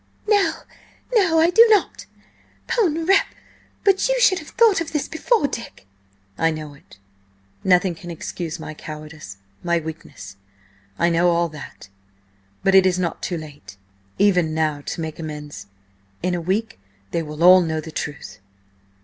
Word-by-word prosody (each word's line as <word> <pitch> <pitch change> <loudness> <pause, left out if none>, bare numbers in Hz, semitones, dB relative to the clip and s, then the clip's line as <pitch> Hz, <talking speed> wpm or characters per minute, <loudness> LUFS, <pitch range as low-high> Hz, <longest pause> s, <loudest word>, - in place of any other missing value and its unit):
"No! 410 -2 +3 0.6
No! 370 -8 +4
I 330 +2 +4
do 450 +5 +8
not! 420 -3 +1 0.6
'Pon 330 -8 0
rep., 390 +3 +4 0.6
but 390 +3 +3
you - - +1
should 390 -7 +4
have 305 - -12
thought 445 -7 +3
of 325 - -5
this 300 - -1
before, 375 +4 +1
Dick!" 230 - -8 0.5
"I 165 - +3
know 155 -2 -6
it. 100 -8 -19 0.7
Nothing 180 0 +3
can 175 +1 -11
excuse 170 0 -6
my 155 - -7
cowardice–my 150 - -6
weakness. 160 -10 -9 0.6
I 170 - +2
know 170 +1 +3
all 170 0 +1
that, 150 -9 -11 0.7
but 195 - +3
it 190 -1 +7
is 180 -1 +1
not 175 -2 -2
too 175 - -3
late 145 -9 -11 0.4
even 180 -6 +2
now 155 -2 0
to - - -4
make 160 0 -6
amends. 150 -9 -7 0.6
In 180 0 0
a 175 - -2
week 195 - -2 0.3
they 170 - -1
will 150 +1 -5
all 185 +1 +8
know 160 -2 -2
the 155 +1 -8
truth." 140 -11 -6
170 Hz, 155 wpm, -21 LUFS, -, 0.7 s, do